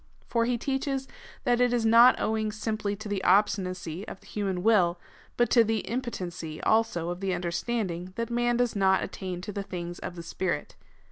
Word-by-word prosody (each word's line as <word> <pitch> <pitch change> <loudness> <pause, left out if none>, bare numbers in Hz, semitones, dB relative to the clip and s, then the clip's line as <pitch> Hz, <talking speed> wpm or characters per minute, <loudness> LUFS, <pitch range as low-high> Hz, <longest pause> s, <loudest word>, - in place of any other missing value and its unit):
For 230 -1 +1
he 245 0 +1
teaches, 270 +1 -2 0.4
that 245 0 +2
it 245 -1 +4
is 240 -2 +1
not 235 +3 +7
owing 220 0 0
simply 215 -1 -2
to 215 +1 -8
the 200 -2 -2
obstinacy 185 -2 +1
of - - -8
the - - -22
human 190 -4 -2
will, 180 -6 +4 0.4
but 240 - +2
to 235 - +7
the 225 0 0
impotency, 180 -10 -4
also, 220 -7 +2
of 175 - -5
the 190 -1 -1
understanding, 180 0 -2
that 230 0 -3
man 240 0 +1
does 245 -2 +1
not 190 -1 +3
attain 185 -2 -5
to 205 +3 -6
the 200 - -3
things 175 -2 -6
of 180 - -6
the 170 - -7
Spirit. 170 -2 -3
205 Hz, 190 wpm, -28 LUFS, 180-235 Hz, 0.4 s, not